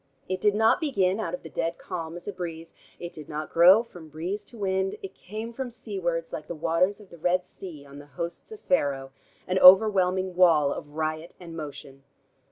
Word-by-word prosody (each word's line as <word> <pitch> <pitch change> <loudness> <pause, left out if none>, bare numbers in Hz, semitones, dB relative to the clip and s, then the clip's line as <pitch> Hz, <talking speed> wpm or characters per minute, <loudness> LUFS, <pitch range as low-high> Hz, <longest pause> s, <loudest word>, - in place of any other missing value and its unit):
It 185 0 -3
did 205 -1 +3
not 220 +7 +4
begin, 200 - +1
out 180 -5 -2
of - - -14
the - - -8
dead 165 +2 -2
calm, 165 -2 -6
as 175 - -13
a 205 - -3
breeze; 165 -2 -7 0.2
it 175 0 -7
did 155 -2 -11
not 155 0 -5
grow 185 +7 +7
from 175 -9 -13
breeze 170 +7 -4
to 235 - -15
wind; 190 -1 -1
it 195 -1 -7
came 220 +4 -7
from 260 +1 -4
seawards, 185 -8 -4
like 150 - -6
the 170 - -5
waters 170 +5 +1
of 205 -3 -16
the 170 - -13
Red 180 +2 +1
Sea 165 -7 -8
on 140 0 -12
the 145 - -13
hosts 170 - -5
of 435 0 -10
Pharaoh, 140 - 0 0.4
an 185 +1 +1
overwhelming 185 -1 +6
wall 160 -6 +5
of 145 0 -9
riot 155 +1 -3
and 170 -2 -10
motion. 140 -3 -8
180 Hz, 205 wpm, -26 LUFS, 160-195 Hz, 0.4 s, grow